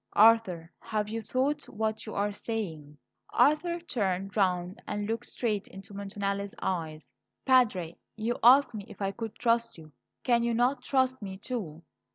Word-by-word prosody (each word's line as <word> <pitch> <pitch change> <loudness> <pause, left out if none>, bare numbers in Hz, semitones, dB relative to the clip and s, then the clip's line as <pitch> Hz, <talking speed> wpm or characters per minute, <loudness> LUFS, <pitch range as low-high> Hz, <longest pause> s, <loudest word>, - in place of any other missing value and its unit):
Arthur, 205 -7 +5
have 210 -1 -2
you 225 +1 -3
thought 265 +6 -1
what 220 +1 -2
you 215 - -6
are 205 +1 0
saying?" 165 -10 -5 0.3
Arthur 340 +4 +3
turned 200 - -2
round 185 -1 0
and 205 0 -2
looked 225 +1 -3
straight 210 -4 -2
into 195 +1 -12
Montanelli's 200 0 -3
eyes. 160 -4 -3 0.3
"Padre, 215 -11 +3 0.2
you 225 +2 -1
asked 255 +1 +7
me 210 -2 -5
if - - -13
I 195 -1 0
could 225 +1 -6
trust 230 -2 +1
you. 155 -2 -13 0.3
Can 240 -2 +3
you 235 0 +1
not 250 +3 +2
trust 260 -1 +1
me, 190 -2 -6
too? 190 -8 -5
215 Hz, 160 wpm, -29 LUFS, 195-240 Hz, 0.3 s, asked